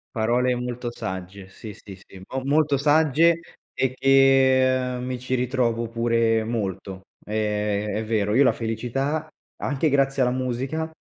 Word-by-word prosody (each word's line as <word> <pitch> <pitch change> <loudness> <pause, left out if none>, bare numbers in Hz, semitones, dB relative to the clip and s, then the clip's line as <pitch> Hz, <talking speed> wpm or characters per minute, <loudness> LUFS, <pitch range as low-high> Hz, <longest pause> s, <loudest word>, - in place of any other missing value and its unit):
Parole 120 +3 +1
molto 125 0 -4
sagge, 95 0 -7
sì, 105 +2 -10
sì, 100 -1 -12
sì. 95 0 -15
Mo 130 0 -2
molto 145 0 +2
sagge 160 +3 +3 0.3
e 130 -1 -1
che, 130 -1 +3
ehm, 125 - -5
mi 125 -1 -4
ci 130 +1 -2
ritrovo 120 -2 -1
pure 115 -1 +1
molto. 95 -4 -4 0.2
È 105 -1 -1
è 110 - -1
vero, 105 -2 0
io 135 +3 +5
la - - +4
felicità 130 +7 -3 0.3
anche 145 +3 -1
grazie 135 -1 +1
alla 125 0 +2
musica 130 +5 -3
125 Hz, 145 wpm, -23 LUFS, 110-135 Hz, 0.3 s, io